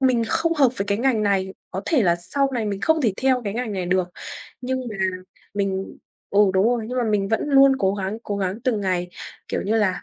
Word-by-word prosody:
mình 255 -3 +3
không 330 0 +2
hợp 275 -4 +5
với 195 - -1
cái 200 +1 0
ngành 245 -4 +2
này, 195 -2 0 0.2
có 190 +2 -4
thể 290 -9 +3
là 170 -2 +3
sau 275 +11 0
này 230 -4 -1
mình 200 -1 -3
không 320 0 +2
thể 220 -5 +2
theo 255 -1 +2
cái 200 - -2
ngành 240 -2 -2
này 185 -3 -3
được. 180 0 +1 0.5
Nhưng 260 +1 -2
mà 215 - -6 0.6
mình 195 -1 -2 0.3
ừ, 200 - +1 0.2
đúng 190 +3 +4
rồi, 240 -2 +1
nhưng 250 0 -2
mà 240 - +1
mình 205 -2 +1
vẫn 225 +6 0
luôn 275 -1 +6
cố 195 0 +1
gắng, 200 +2 -3
cố 205 -3 -3
gắng 195 +3 -2
từng 230 -5 +1
ngày, 180 -2 -1 0.4
kiểu - - -2
như 215 +3 0
là, 200 -4 +1
210 Hz, 240 wpm, -23 LUFS, 195-250 Hz, 0.6 s, luôn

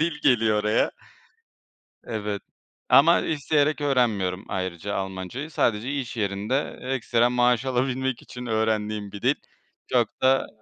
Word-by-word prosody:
dil 160 -2 0
geliyor 110 -4 +3
oraya. 105 +1 +2 1.1
Evet 105 -3 -4 0.5
ama 165 +5 +6
isteyerek 150 0 +1
öğrenmiyorum 110 -9 +1
ayrıca 95 0 -3
Almancayı. 95 - -5
Sadece 115 -1 0
iş 130 -4 -4
yerinde 105 +6 -1
ekstra 120 -2 +1
maaş 125 0 +2
alabilmek 130 0 -1
için 125 0 -9
öğrendiğim 110 -2 -1
bir 100 0 -8
dil. - - +3 0.5
Çok 120 -3 0
da 130 +1 +3
120 Hz, 120 wpm, -25 LUFS, 105-130 Hz, 1.1 s, ama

